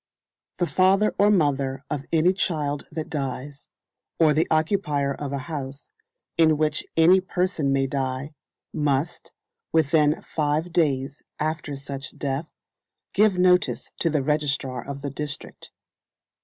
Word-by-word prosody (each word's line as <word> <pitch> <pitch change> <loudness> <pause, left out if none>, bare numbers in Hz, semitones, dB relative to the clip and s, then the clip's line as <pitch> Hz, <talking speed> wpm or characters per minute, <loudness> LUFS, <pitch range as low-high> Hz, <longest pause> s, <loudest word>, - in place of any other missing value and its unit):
The 175 - +1
father 190 +4 +3
or 205 +1 +6
mother 140 -7 +1
of 145 0 -4
any 165 +3 +4
child 150 -6 -1
that 160 0 -4
dies, 140 -1 -5 0.5
or 155 -2 +5
the 155 +2 +2
occupier 155 -4 +1
of 140 0 -5
a 140 - -1
house 140 -3 -6 0.5
in 160 -2 +5
which 155 0 0
any 180 +4 +6
person 180 -6 -1
may 135 0 +2
die, 135 +1 -3 0.4
must, 145 +1 -1 0.4
within 155 -1 +3
five 155 +2 -1
days 145 -4 0 0.2
after 155 -2 -2
such 140 0 -6
death, 140 +3 -3 0.6
give 205 -2 +4
notice 180 0 +2
to 165 - +2
the 150 -3 0
registrar 135 -4 -1
of 140 0 -7
the 140 - -3
district. 145 +1 -6
150 Hz, 130 wpm, -24 LUFS, 140-165 Hz, 0.6 s, or